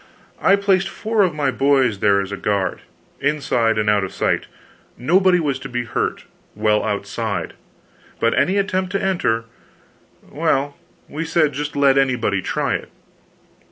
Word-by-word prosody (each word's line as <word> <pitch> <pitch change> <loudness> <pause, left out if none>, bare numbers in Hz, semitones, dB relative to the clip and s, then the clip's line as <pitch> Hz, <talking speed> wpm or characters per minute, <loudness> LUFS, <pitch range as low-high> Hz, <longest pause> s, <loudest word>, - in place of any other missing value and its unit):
I 195 - +5
placed 195 -1 +1
four 220 +2 -1
of 180 -5 +2
my 140 -3 0
boys 130 -5 +2
there 100 -1 +3
as 100 0 -6
a - - -2
guard 100 -2 -1 0.4
inside, 125 -6 +1
and 105 -1 0
out 105 -2 +3
of 95 - -4
sight. - - -1 0.5
Nobody 180 +7 +3
was 145 -5 -1
to 135 - -8
be 120 0 -2
hurt 120 - -3 0.3
while 105 0 +2
outside; 105 -2 -3 0.7
but 115 - +2
any 160 +10 +2
attempt 190 -2 0
to 195 - +1
enter 145 -13 0 0.8
well, 145 -2 0 0.3
we 155 +3 -4
said 160 -3 +1
just 150 +1 -4
let 140 -1 +4
anybody 120 -7 +1
try - - -1
it! - - -4
140 Hz, 155 wpm, -20 LUFS, 110-175 Hz, 0.8 s, I